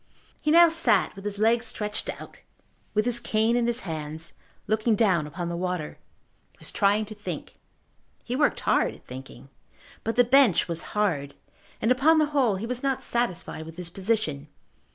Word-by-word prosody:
He 300 - -1
now 340 +2 +8
sat 330 -7 +3
with 195 - -10
his 205 -1 -3
legs 230 +2 +2
stretched 210 -1 -3
out, - - -11 0.6
with 215 +1 +2
his 240 -1 +2
cane 225 0 +1
in 240 -1 +1
his 240 +1 0
hands, 160 -1 -6 0.3
looking 215 +1 +1
down 185 -8 +2
upon 170 +3 -5
the 170 - -3
water. 180 -3 -3 0.5
He - - -30
was - - -4
trying 205 +1 +2
to 215 - -9
think. 210 0 -7 0.6
He 245 - -3
worked 290 +2 +1
hard - - +1
at - - -20
thinking. 130 +1 -10 0.5
But 225 - -2
the 245 - +6
bench 245 -5 +4
was 170 -1 -3 0.2
hard 150 -9 0 0.5
and, 225 - +3
upon 295 +6 +4
the 310 - +4
whole, 250 -8 +3
he 195 +4 -4
was 250 +1 -4
not 270 -2 -1
satisfied 235 -9 -2
with 165 +1 -11
his 175 -2 -5
position. 185 -8 -1
215 Hz, 180 wpm, -26 LUFS, 170-240 Hz, 0.6 s, now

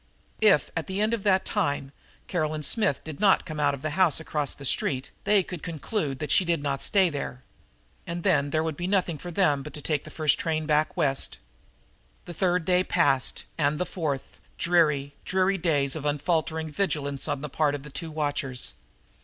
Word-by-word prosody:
If, 205 -8 +4
at 165 - -2
the 190 +1 -3
end 215 +2 +2
of 230 - -1
that 190 -2 +3
time, 145 -9 -1 0.4
Caroline 155 -3 -1
Smith 145 - +1
did 155 -3 -8
not 195 -2 +4
come 155 -3 -6
out 145 -1 +2
of 135 - -13
the 155 - -1
house 175 -1 +3
across 150 -3 -2
the 140 - -9
street 130 0 0
they 200 -1 +4
could 180 -2 -7
conclude 160 -2 -3
that 150 +2 -4
she 195 - +5
did 170 -4 0
not 140 -1 -1
stay 190 -4 +3
there. 130 -3 -5 0.6
And 170 0 -4
then 145 -1 +3
there 155 +2 +1
would 160 -2 -2
be 175 +4 -3
nothing 185 -5 +1
for - - -9
it 175 - -7 0.2
but 145 +2 -8
to - - -5
take 150 -3 0
the - - -10
first 155 -1 +2
train 155 -1 -1
back 150 +3 +1
West. 140 -5 0 0.9
The 175 - -7
third 180 0 +1
day 180 +1 +3
passed 140 -9 +1
and 150 0 +2
the 180 - -1
fourth, 150 -8 -4 0.2
dreary, 150 -5 +2
dreary 190 +1 +1
days 145 -5 +1
of 155 - -5
unfaltering 160 +2 -1
vigilance 145 -6 -1
on 135 - -2
the 150 - -3
part 145 0 +1
of 140 - -7
the 150 - -10
two 165 +3 -5
watchers. 145 -4 -2
155 Hz, 200 wpm, -27 LUFS, 145-175 Hz, 0.9 s, she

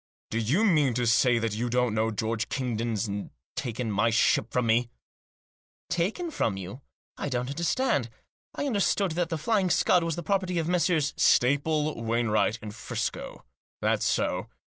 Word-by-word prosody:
" - - -83
Do 115 - 0
you 145 - +2
mean 150 - +3
to 125 0 0
say 120 +1 +4
that 115 -2 -1
you 120 +3 -2
don't 125 -1 +1
know 110 +1 +1
George 110 +1 -2
Kingdon's 115 -4 -2 0.5
taken 120 -3 -3
my 105 +3 +2
ship 110 0 +2
from 125 -1 +1
me? 115 +2 +2 0.5
" - - -82
"Taken 180 - 0
her 335 - -4
from 110 - -1
you? 95 +8 -7 0.4
I - - -3
don't 125 0 -2
understand. 165 - 0 0.5
I 285 - -2
understood 200 -6 +1
that 170 +1 -1
The 165 - -2
Flying 190 +4 +1
Scud 175 0 +3
was 165 -2 -1
the 175 - -5
property 185 0 0
of 165 -1 0
Messrs. 170 -4 +1
" - - -40 0.2
"Staple, 150 +1 +1
Wainwright 115 -2 +1
and 105 -1 -6
Friscoe; - - -5 0.4
thafs - - +1
so. - - 0
125 Hz, 175 wpm, -27 LUFS, 115-170 Hz, 0.5 s, say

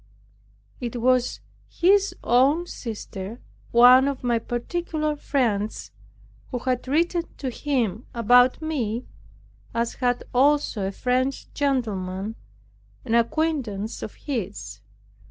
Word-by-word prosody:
It 240 -1 -4
was 250 +1 +2 0.3
his 395 +3 +3
own 275 +8 +3
sister, 220 - -7 0.3
one 250 +3 +7
of 280 -2 -3
my 240 -2 +2
particular 305 +6 -2
friends, 230 -8 -1 0.6
who 250 - -3
had 250 0 -2
written 335 +4 +1
to 260 -3 -3
him 240 -6 -1
about 245 +4 +4
me, 250 -7 -2 0.7
as 235 0 0
had 245 -2 0
also 260 -6 +2
a - - -3
French 255 +5 -1
gentleman, 215 -8 -1 0.7
an 225 - -2
acquaintance 235 -4 0
of 215 - -7
his. 105 - -5
245 Hz, 105 wpm, -24 LUFS, 225-285 Hz, 0.7 s, one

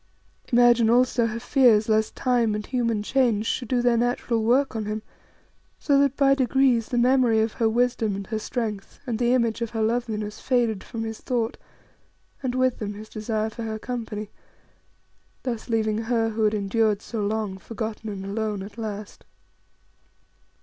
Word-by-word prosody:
Imagine 240 -2 +5
also 245 -1 +3
her 230 +1 -4
fears 240 -4 +4
lest 220 0 +1
time 240 -4 +1
and 210 0 -4
human 230 -4 -1
change 235 -3 +1
should 245 +1 -2
do 245 0 +1
their 240 -1 +3
natural 240 -1 0
work 255 +3 +2
on 220 -1 -2
him, 215 +1 -4 0.7
so 280 -2 +2
that 280 -1 +2
by 275 -1 +5
degrees 260 -3 +2
the 245 - -1
memory 245 -2 +4
of 220 0 0
her 225 -3 +1
wisdom 230 -3 +1
and 195 0 -5
her 220 +2 -3
strength, 215 -3 -4
and 235 -4 -2
the 240 0 +2
image 230 -2 0
of 230 - -1
her 225 0 -3
loveliness 220 -2 -2
faded 235 -6 +1
from 225 -2 -5
his 225 -1 -6
thought, 235 -2 -1 0.9
and 255 -2 -2
with 255 -1 +1
them 205 -1 -4
his 215 +1 -10
desire 220 0 -2
for 230 - -8
her 220 -1 -3
company; 215 -3 -5 1.1
thus 240 -2 -4
leaving 220 -1 +1
her 225 0 0
who 220 0 0
had 210 0 +2
endured 210 +1 +1
so 225 -3 -4
long, 205 -2 -2
forgotten 220 0 -5
and 195 -2 -6
alone 210 -1 -2
at 205 +3 -10
last. 210 -2 -6
225 Hz, 170 wpm, -25 LUFS, 215-245 Hz, 1.1 s, Imagine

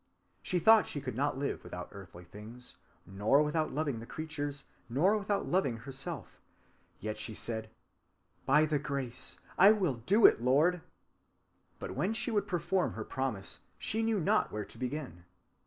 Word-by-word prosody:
She 180 - -1
thought 220 +6 +6
she 145 - -3
could 130 -3 -5
not 140 +1 0
live 140 +1 -3
without 90 0 -7
earthly 90 -3 -11
things, 110 +7 -11 0.3
nor 105 - +3
without 155 +1 0
loving 145 -5 -1
the 115 - -9
creatures, 145 -2 -4 0.3
nor 165 - +3
without 205 -1 -1
loving 155 -10 +1
herself. 135 +3 -7 0.6
Yet 110 +1 -4
she 110 0 -3
said, 110 0 -3 0.8
'By 150 +3 +5
thy 150 -1 0
Grace 140 -4 -4 0.2
I 195 +3 +9
will 180 - 0
do 210 +3 +5
it, - - +7
Lord!' 155 +8 +3 1.0
But - - -6
when 195 +5 0
she 240 - -1
would 210 -2 0
perform 175 0 0
her - - -5
promise, 130 -8 -3 0.2
she 220 - -1
knew 225 -2 +1
not 160 - +2
where 105 -1 -4
to - - -11
begin. 130 - -5
140 Hz, 160 wpm, -32 LUFS, 115-175 Hz, 1.0 s, I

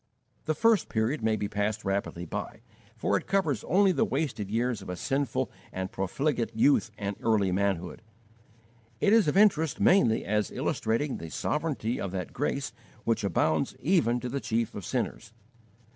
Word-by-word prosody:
The 155 - 0
first 225 +4 +3
period 115 +6 0
may 110 0 +2
be 105 -1 -2
passed 105 +1 -2
rapidly 95 -3 -2
by, 80 - -5 0.4
for - - +1
it - - -7
covers 160 - +1
only 195 +1 +4
the 205 - +2
wasted 130 - -2
years 115 0 0
of 95 - -9
a 90 - -3
sinful 135 +6 -1 0.2
and 95 0 -4
profligate 115 - -1
youth 120 0 +4
and 100 -1 -3
early 105 -4 +2
manhood. 95 -1 -1 1.0
It 205 - +3
is 225 -7 +5
of 150 - +1
interest 160 -7 +4
mainly 125 - +4
as 105 -1 0
illustrating 120 +6 -1
the 80 - -7
sovereignty 130 - -2
of 100 - -2
that 90 -3 -4
Grace - - -2 0.3
which 115 -2 0
abounds 80 -5 +1
even 150 -9 +2
to 125 - -3
the 140 +2 -3
chief 115 0 -1
of 100 - -6
sinners. 115 -1 -3
115 Hz, 165 wpm, -28 LUFS, 100-150 Hz, 1.0 s, is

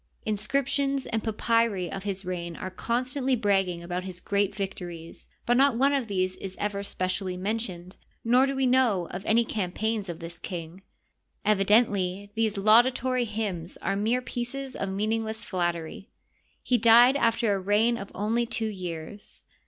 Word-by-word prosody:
Inscriptions 275 +6 0
and 225 -1 -2
papyri 220 -4 +1
of 195 - -4
his 195 -1 -3
reign 175 -2 -4
are 185 - -6
constantly 255 +6 0
bragging 195 -6 +1
about 180 +1 -3
his 185 -1 -6
great 200 +1 0
vic 195 -1 -2
tories, 170 -2 -9 0.2
but 240 0 +3
not 270 -3 +4
one 275 +3 +3
of 270 -5 0
these 185 -2 -1
is 190 -1 -7
ever 205 -1 -2
specially 185 -1 -2
mentioned, 185 -3 -4 0.3
nor 250 +3 +4
do 275 - -2
we 265 0 +1
know 245 -9 +3
of 185 +2 -6
any 230 +2 +4
campaigns 210 +1 -2
of 170 - -4
tnis 170 0 -9
king. 175 +1 -6 0.6
Evident 210 +3 +4
ly 195 +1 -3
these 220 -1 0
laudatory 245 +4 +4
hymns 205 -6 -4
are 195 - -2
mere 225 +5 0
pieces 260 +2 -5
of 195 - -3
meaningless 220 +2 -2
fiatteiy. 175 +2 -3 0.6
He 245 -2 +2
died 235 +4 +7
after 230 -4 +2
a 195 - -1
reign 210 +5 +2
of 195 - -8
only 225 +4 0
two 225 -2 -1
years. 180 0 -7
210 Hz, 160 wpm, -27 LUFS, 185-235 Hz, 0.6 s, died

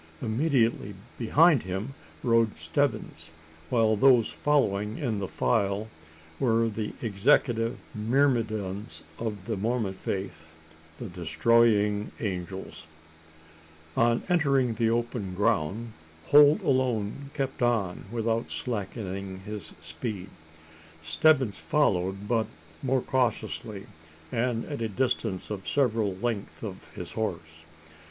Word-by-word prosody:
Immediately 115 - +1 0.2
behind 150 +4 +5
him 95 +8 -4 0.3
rode 115 -2 +3
Stebbins; 80 0 -2 0.4
while 110 -3 +3
those 120 0 +5
following 105 -8 +1
in 110 -9 -2
file 105 0 0 0.5
were 115 -3 +2
the 110 0 -4
executive 115 +2 +2 0.2
myrmidons 110 -4 0 0.2
of 105 -4 -4
the 115 0 -2
Mormon 110 0 -1
faith 85 -5 -5 0.4
the - - -6
Destroying 105 +3 +2
Angels! 95 -4 -5 1.1
On 115 0 +3
entering 140 -9 +2
the 110 +1 +1
open 115 -5 -2
ground, 110 +2 0 0.4
Holt 145 +1 +7
alone 130 -1 0
kept 135 -3 -3
on 110 -7 0
without 115 0 -1
slackening 100 -4 -4
his 105 -6 -7
speed. 100 -6 -5 0.7
Stebbins 125 - +3
followed, 100 -8 +1
but 115 -1 +1 0.3
more 130 -1 +1
cautiously 120 -5 -1 0.5
and 120 0 0
at 145 -6 -5
a 115 - -1
distance 110 -4 -1
of 95 -3 -5
several 115 -8 +1
lengths 110 +1 -4
of 95 -4 -7
his 90 - -6
horse. 85 -7 -4
110 Hz, 105 wpm, -28 LUFS, 100-120 Hz, 1.1 s, Holt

